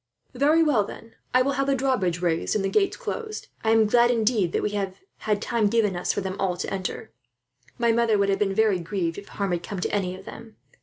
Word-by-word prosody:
"Very 295 +6 +4
well, 275 -10 +3
then, 225 +3 -11 0.2
I 255 0 +4
will 275 - 0
have 275 - -1
the 275 - +3
drawbridge 195 -10 0
raised 170 +2 0
and 200 -2 0
the - - +1
gates 395 -2 +1
closed. 445 -3 -5
I 220 - +1
am 225 -1 +5
glad, 240 +3 +4
indeed, 220 -6 +2
that - - -1
we 210 - 0
have 195 -2 -3 0.3
had 210 0 +1
time 230 -3 +1
given 210 -3 +1
us 175 - -1
for - - -2
them 190 0 -4
all 180 -2 0
to - - -4
enter. 190 -1 -4 0.7
My 235 -1 +3
mother 230 -2 +2
would 200 0 +2
have 195 - +1
been 195 -2 0
very 215 -4 +3
grieved, 170 0 -3
if 200 - -13
harm 200 -2 -3
had 175 -1 -1
come 195 +2 -6
to - - -2
any 185 -3 -1
of 190 - -14
them. 225 -1 -11
210 Hz, 245 wpm, -25 LUFS, 190-235 Hz, 0.7 s, am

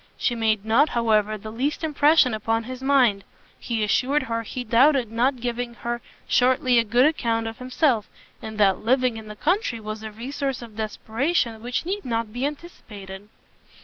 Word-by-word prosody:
She 245 - 0
made 220 -3 0
not, 250 +8 +4
however, 215 -2 +2
the 215 +1 -9
least 275 +8 -2
impression 300 -4 +4
upon 225 +1 -1
his 255 +2 -8
mind; 255 -8 +3 0.4
he 230 -3 -2
assured 265 +7 +1
her 230 -2 -2
he 250 +3 -6
doubted 245 +1 +3
not 250 +3 +1
giving 240 0 -3
her 240 0 -4 0.3
shortly 255 0 +3
a - - +3
good 240 +4 +3
account 230 -7 0
of 225 0 -6
himself, 255 -3 0 0.3
and 220 -1 -7
that 195 -3 +3
living 250 0 +1
in 220 -1 -9
the 210 - -8
country 325 - 0
was 215 0 -6
a 220 - -6
resource 260 +3 -4
of 225 -3 -12
desperation 225 +3 -1
which 245 +6 -3
need 400 +3 -3
not 230 -3 -3
be 250 +3 -1
anticipated. 210 - -10
235 Hz, 175 wpm, -24 LUFS, 220-260 Hz, 0.4 s, not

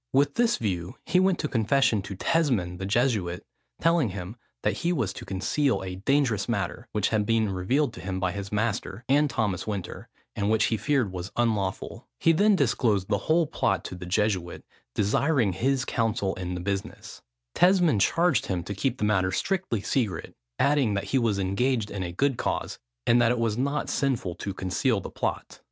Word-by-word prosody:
With 140 +1 +3
this 235 -1 +2
view, 90 -5 -3
he 180 - +3
went 185 -1 +3
to 150 - -2
confession 115 -2 +2
to 100 +1 -7
Tesmond 100 - 0
the 95 - -3
Jesuit, 105 -6 0 0.3
telling 165 -7 +3
him 95 +2 -6 0.3
that - - 0
he 170 - 0
was 115 - -1
to - - -9
conceal 115 +6 0
a 90 -1 -5
dangerous 120 -1 +1
matter, 110 +2 -2
which 105 -2 0
had 110 -2 +1
been 110 -1 +1
revealed 115 +9 0
to - - -9
him 95 0 -3
by 95 -1 0
his 100 +1 -6
master, 110 0 -2
and 145 +2 +3
Thomas 110 -7 -1
Winter, 100 -4 -5 0.3
and 100 0 0
which 110 0 +3
he 115 - +1
feared 130 -6 +1
was 90 +1 -6
unlawful. 105 -5 -1
He 165 - +4
then 205 +5 +4
disclosed 115 - +1
the 100 -2 +1
whole 165 +1 +4
plot - - 0
to - - -6
the 90 0 -8
Jesuit, 90 -2 -1 0.3
desiring 105 - +2
his 130 +6 0
counsel 115 -4 0
in 90 -1 -4
the 90 - -4
business. 100 +1 -5 0.3
Tesmond 175 - +4
charged 170 - +2
him 90 -3 -2
to 100 - -5
keep 130 +6 -1
the - - -3
matter 95 -3 +2
strictly 185 - -1
secret, 110 -3 -2 0.2
adding, 140 -7 +2
that 100 - -1
he 135 - +4
was 115 -4 +1
engaged 105 +4 0
in 100 - -4
a 90 -1 -3
good 135 +7 0
cause, - - -2 0.3
and 120 +1 +4
that 115 - +4
it 125 - 0
was 115 -2 0
not 140 +4 -1
sinful 125 -10 -1
to 100 +3 -5
conceal 100 +5 0
the - - -8
plot. - - -4
110 Hz, 190 wpm, -26 LUFS, 95-135 Hz, 0.3 s, He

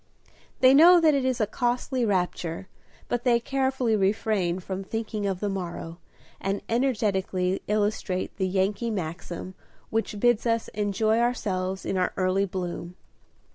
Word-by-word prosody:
They 260 0 +7
know 345 +5 +8
that 320 -2 +4
it 275 -2 +1
is 255 -1 0
a 215 - +3
costly 245 +3 -1
rapture, 180 -3 -1 0.4
but 245 0 -2
they 240 -2 +4
carefully 265 -2 0
refrain 195 -3 +1
from 190 +1 -5
thinking 215 0 -3
of 190 -2 -2
the 205 - 0
morrow, 175 -3 -5 0.4
and 195 +1 -2
energetically 200 -7 0
illustrate 205 -3 -1
the 190 -2 0
Yankee 195 +5 0
maxim 175 -1 -5 0.4
which 220 -2 -1
bids 240 0 +3
us 230 -1 0
enjoy 215 +2 +1
ourselves 190 -6 -1
in 190 - -1
our 180 - 0
early 185 +1 +2
bloom. 180 -2 -5
205 Hz, 140 wpm, -26 LUFS, 185-235 Hz, 0.4 s, know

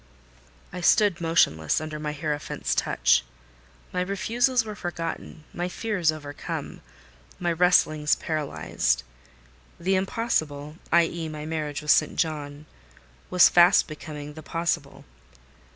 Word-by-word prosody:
I 180 - -5
stood 195 -1 +3
motionless 120 - +2
under 155 -1 -6
my 150 0 -3
hierophant's 150 0 -3
touch. - - +2 0.7
My 180 - 0
refusals 230 +6 +1
were 215 - -5
forgotten—my 175 -2 -5
fears 190 -5 0
overcome—my 70 - -7
wrestlings 160 -3 +3
paralysed. 155 - -1 0.8
The 185 +3 0
Impossible—i.e., 165 -4 0
my 150 -1 -7
marriage 155 -2 -3
with 150 - +3
St. - - +3
John—was 145 - -1
fast 175 +2 +5
becoming 150 -1 -8
the 155 - -10
Possible. 165 -3 -3
155 Hz, 100 wpm, -25 LUFS, 150-175 Hz, 0.8 s, fast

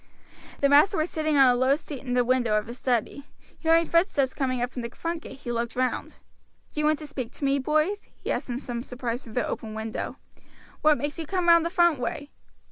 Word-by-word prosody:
The 280 - +5
master 300 +8 +5
was 315 +2 0
sitting 310 -2 0
on 270 - +8
a 250 - +5
low 260 +2 +3
seat 290 -3 -8
in 250 -2 -3
the 250 - +4
window 240 -4 +2
of 210 - -1
his 240 +2 -9
study. 255 +3 -1 0.3
Hearing 330 0 +3
footsteps 335 -7 +2
coming 255 -3 -1
up 245 +1 -1
from 250 - -5
the 235 - -4
front 335 +6 -4
gate 270 - -11
he 240 - -4
looked 235 0 -2
round. 255 0 -2 0.6
"Do - - -4
you 300 - +2
want 310 0 +3
to 305 - -8
speak 260 -5 -5
to 285 - -4
me, 275 0 +2
boys?" 310 +9 0
he - - -5
asked - - -3
in 240 - -2
some 240 -3 -5
surprise 245 0 -4
through 225 - -12
the 245 - 0
open 220 -1 -5
window. 220 0 -4 0.7
"What 305 -1 +5
makes 290 +3 -4
you 320 - -4
come 365 -1 -1
round 335 -1 +6
the - - -3
front 345 -5 +3
way?" 285 +4 -4
275 Hz, 235 wpm, -26 LUFS, 245-310 Hz, 0.7 s, on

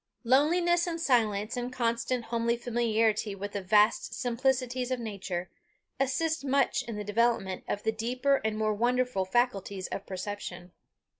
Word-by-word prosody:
Loneliness 340 +7 +3
and 335 -1 -3
silence, 220 -7 +1
and 245 0 -3
constant 235 0 -1
homely 235 0 0
familiarity 225 -3 +1
with 200 +1 -5
the 200 - -3
vast 210 +3 +3
simplicities 255 0 0
of 255 -1 -1
nature, 190 -5 -4 0.5
assist 295 +4 0
much 275 0 +2
in 230 - -6
the 210 - -4
development 205 -3 0
of 205 - -3
the 220 - +2
deeper 250 +5 +1
and 220 -1 -1
more 215 0 +1
wonderful 245 -2 +1
faculties 200 -3 0
of 195 - -5
perception. 185 -2 -6
235 Hz, 145 wpm, -29 LUFS, 205-255 Hz, 0.5 s, Loneliness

